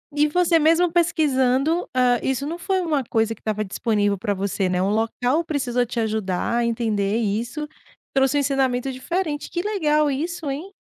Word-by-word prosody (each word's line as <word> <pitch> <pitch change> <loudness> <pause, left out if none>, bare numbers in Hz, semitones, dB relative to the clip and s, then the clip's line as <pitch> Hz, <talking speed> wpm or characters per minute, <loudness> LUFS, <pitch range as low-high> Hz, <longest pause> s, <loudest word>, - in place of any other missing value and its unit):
E 295 +1 +3
você 345 +2 +3
mesmo 330 +2 +3
pesquisando, 310 -2 +2
hã, 250 -1 +3
isso 265 +1 -1
não 330 +3 -4
foi 375 +2 -1
uma 305 -6 0
coisa 225 -1 0
que - - -26
estava 215 -1 -2
disponível 205 0 0
para 205 +1 -1
você, 195 0 -1
né. 180 0 0
O 190 - +1
local 245 +8 0
precisou 250 -6 0
te 235 0 -4
ajudar 215 -2 -1
a 240 - +1
entender 220 -3 0
isso, 235 +7 -2 0.5
trouxe 270 0 +2
um - - +3
ensinamento 270 -2 0
diferente, 295 +3 -3
que 345 - -1
legal 305 -7 +1
isso, 320 +3 -3
hein? 305 +8 -5
265 Hz, 175 wpm, -22 LUFS, 225-315 Hz, 0.5 s, E